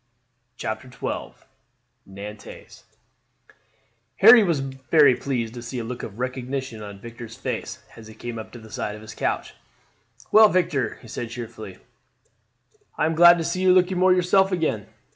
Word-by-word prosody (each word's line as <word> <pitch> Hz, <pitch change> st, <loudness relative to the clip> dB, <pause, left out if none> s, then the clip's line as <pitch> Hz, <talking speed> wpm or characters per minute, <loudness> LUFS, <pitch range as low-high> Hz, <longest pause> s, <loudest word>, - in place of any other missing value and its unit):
CHAPTER 110 Hz, +4 st, -5 dB
XII 125 Hz, -, -5 dB, 0.7 s
Nantes 105 Hz, +2 st, -11 dB, 1.3 s
Harry 225 Hz, +2 st, +8 dB
was 170 Hz, -7 st, +1 dB
very 135 Hz, +1 st, +3 dB
pleased 120 Hz, -5 st, -3 dB
to 120 Hz, -, -8 dB
see 120 Hz, +2 st, -6 dB
a 120 Hz, -, -3 dB
look 120 Hz, +2 st, -6 dB
of 105 Hz, -1 st, -8 dB
recognition 130 Hz, -1 st, -4 dB
on 100 Hz, -1 st, -9 dB
Victor's 115 Hz, +1 st, -10 dB
face -, -, -5 dB
as 110 Hz, -1 st, -12 dB
he 110 Hz, -, -13 dB
came 120 Hz, 0 st, -6 dB
up 110 Hz, -, -9 dB
to -, -, -9 dB
the 110 Hz, -1 st, -14 dB
side 105 Hz, 0 st, -4 dB
of 105 Hz, -, -12 dB
his 110 Hz, 0 st, -10 dB
couch. -, -, -3 dB, 0.8 s
"Well, 215 Hz, 0 st, +8 dB
Victor," 155 Hz, -, 0 dB
he -, -, -12 dB
said 115 Hz, +1 st, -6 dB
cheerfully, 115 Hz, -5 st, -8 dB, 1.2 s
"I -, -, +1 dB
am 160 Hz, -, 0 dB
glad 175 Hz, +1 st, +7 dB
to 165 Hz, -, -2 dB
see 185 Hz, +3 st, -2 dB
you 185 Hz, -1 st, +5 dB
looking 185 Hz, 0 st, +2 dB
more 185 Hz, 0 st, +5 dB
yourself 185 Hz, +2 st, +3 dB
again." 155 Hz, -, -1 dB
125 Hz, 160 wpm, -23 LUFS, 110-170 Hz, 1.3 s, Harry